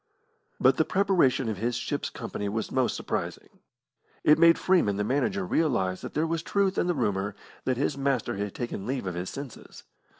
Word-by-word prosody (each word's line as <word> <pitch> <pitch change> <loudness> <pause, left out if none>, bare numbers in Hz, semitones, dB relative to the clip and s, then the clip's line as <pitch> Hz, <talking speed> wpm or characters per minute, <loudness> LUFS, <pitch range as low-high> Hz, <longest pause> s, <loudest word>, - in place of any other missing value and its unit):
But - - +4
the - - +4
preparation 185 -10 +2
of 110 -3 -2
his 120 +2 -1
ship's 145 +4 -2
company 105 -4 -5
was 110 +1 -3
most 130 -2 +1
surprising. - - -4 0.6
It 150 +1 +6
made 165 0 +7
Freeman, 175 - +2
the 105 - -1
manager, 185 - 0
realise 120 - +1
that - - -8
there 155 - +2
was 165 0 -1
truth 195 +2 +1
in - - +1
the 175 - +1
rumour 100 -5 -1 0.3
that 130 -2 +1
his 140 +1 -1
master 135 -7 0
had 100 -1 -4
taken 120 -5 -4
leave 130 -4 -2
of 90 - -2
his 90 +1 -4
senses. 140 -3 -9
130 Hz, 190 wpm, -27 LUFS, 105-165 Hz, 0.6 s, made